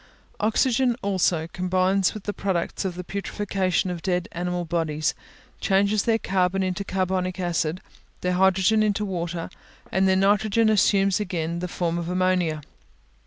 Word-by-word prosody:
Oxygen, 240 +3 +2
also, 185 -5 +1
combines 185 +2 +1
with 215 - -7
the 205 - -3
products 190 -1 -2
of 185 -2 -2
the 180 - -5
putrefaction 195 -1 -1
of 175 -2 -5
dead 180 -1 -1
animal 175 0 -3
bodies, 160 -2 -1 0.5
changes 200 +1 +2
their 225 -1 +3
carbon 190 -2 0
into 185 +1 -2
carbonic 185 -1 -1
acid, 175 -1 -1 0.4
their 180 0 0
hydrogen 190 +3 +3
into 210 0 +1
water, 175 -3 -3 0.4
and 190 +1 +2
their 190 - +4
nitrogen 210 +3 +3
assumes 195 -2 +3
again 170 -4 -2
the 180 - -3
form 170 -1 -2
of 170 0 -4
ammonia. 180 -4 +1
185 Hz, 145 wpm, -24 LUFS, 175-200 Hz, 0.5 s, their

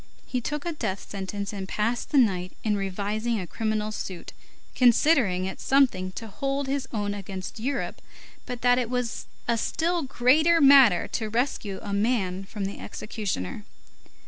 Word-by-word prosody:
He 250 - -2
took 295 +5 -3
a 345 - -1
death 210 -10 -4
sentence 200 +1 -5
and 195 -2 -5
passed 230 +3 -1
the 295 - +1
night 185 -7 +2
in 215 -2 +1
revising 205 +4 -2
a 185 - -4
criminal 215 +3 -2
suit, 185 -4 -6 0.4
considering 240 - +4
it 190 - -5
something 245 -10 +2
to 225 - -6
hold 275 +5 -2
his 270 0 -2
own 205 -2 -1
against 195 +1 -6
Europe, 270 +6 -3 0.5
but 250 -2 -5
that 245 0 +4
it 240 -2 -2
was 250 -2 -2 0.2
a 230 -1 +2
still 340 +7 0
greater 300 +5 +4
matter 270 - +7
to 220 -2 -2
rescue 230 -4 -1
a 200 - -4
man 200 -3 0
from 200 0 -4
the 195 - -5
executioner. 185 - -4
220 Hz, 160 wpm, -26 LUFS, 195-255 Hz, 0.5 s, matter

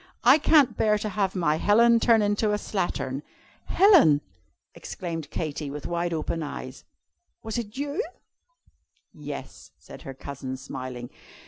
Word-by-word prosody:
I 260 +6 +7
can't 295 -3 +4
bear 210 -1 +2
to 210 +1 -3
have 195 -1 -1
my 155 -4 +1
Helen 230 +5 +4
turn 225 -2 +4
into 205 +1 +1
a - - +1
slattern.'" 145 -10 -3 0.4
"Helen!" 340 - +5 0.5
exclaimed 165 -5 -6
Katy, 150 -3 -4
with 145 -1 -7
wide 170 0 -2
open 165 0 -2
eyes, 150 - -7 0.6
"was 220 +1 -3
it 220 0 -7
you?" 285 +8 -2 1.1
"Yes," - - -8
said - - -13
her 135 - -8
cousin, 130 -1 -6
smiling. 130 -2 -7
185 Hz, 135 wpm, -26 LUFS, 145-225 Hz, 1.1 s, I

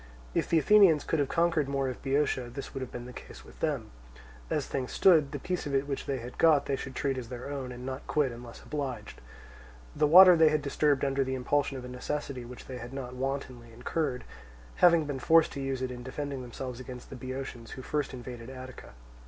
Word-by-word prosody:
If - - 0
the 165 - +4
Athenians 175 -2 +6
could 160 - 0
have 140 - +1
conquered 165 -4 +1
more 135 -1 0
of 130 - -5
Boeotia 135 -3 0
this 135 +3 -7
would 135 - -5
have 130 - -5
been 120 0 -7
the 125 - -9
case - - -11
with - - -16
them: - - -2 0.6
as - - 0
things 130 -2 -3
stood, 160 -7 +5
the 145 - -3
piece 180 +2 -3
of 140 - -1
it 135 +1 +1
which 140 -2 -4
they 135 - -1
had 120 0 -9
got 155 -4 +5
they 140 - 0
should 135 -1 -7
treat 135 -3 -1
as 120 -2 -8
their 125 +3 -6
own, 135 -3 -4
and 125 0 -8
not 130 0 -6
quit 145 -4 +1
unless 120 0 -10
obliged. 140 - -5 0.7
The 150 0 +3
water 180 +3 +10
they 160 -1 +6
had 150 -1 0
disturbed 145 -1 +2
under 135 0 +1
the 130 0 -2
impulsion 135 +2 0
of 125 - -7
a - - -6
necessity 125 +1 -4
which 125 +1 -10
they 130 -1 -7
had 120 +2 -8
not 130 -2 -5
wantonly 130 -2 -4
incurred, 125 +3 -2 0.5
having 170 -3 +5
been 145 -2 -4
forced 160 +5 +5
to 140 - -5
use 135 -1 -2
it 130 - -2
in 125 -1 -7
defending 135 +1 -5
themselves 125 0 -6
against 125 -1 -9
the - - -6
Boeotians 130 -2 -6
who 130 - -8
first 150 0 -2
invaded 120 -1 -8
Attica. 130 - -10
135 Hz, 225 wpm, -29 LUFS, 125-145 Hz, 0.7 s, water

